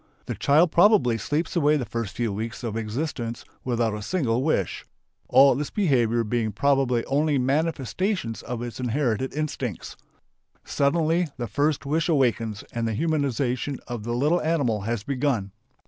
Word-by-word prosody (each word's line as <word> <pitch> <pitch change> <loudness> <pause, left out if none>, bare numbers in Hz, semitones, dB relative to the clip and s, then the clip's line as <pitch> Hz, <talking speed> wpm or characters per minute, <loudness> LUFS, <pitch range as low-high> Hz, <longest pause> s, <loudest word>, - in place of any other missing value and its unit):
The - - -3
child 155 +4 +3
probably 170 - +4
sleeps 155 +9 -2
away 150 -2 +3
the 130 - -3
first 115 -5 -4
few 115 -4 -1
weeks 110 +4 -5
of 115 -2 -3
its 115 - -1
existence 120 0 -4 0.2
without 120 -3 0
a 105 - -5
single 125 - 0
wish, 130 - 0 0.5
all 135 +1 +6
its 150 - -3
behaviour 120 - +2
being 110 0 -1
probably 135 0 +1
only 145 +1 +1
manifestations 145 - -1
of 120 -1 -5
its 120 0 -6
inherited 125 0 0
instincts. 140 - -4 0.7
Suddenly 165 +4 +1
the 120 - -3
first 145 +4 0
wish 155 +4 0
awakens 120 -6 +1
and 115 -1 -1
the 110 - -2
humanization 140 -3 -1
of 120 -3 -5
the 120 +2 -3
little 150 +8 +2
animal 140 -10 0
has 115 -3 -2
begun. 130 -7 -1
130 Hz, 155 wpm, -25 LUFS, 115-150 Hz, 0.7 s, all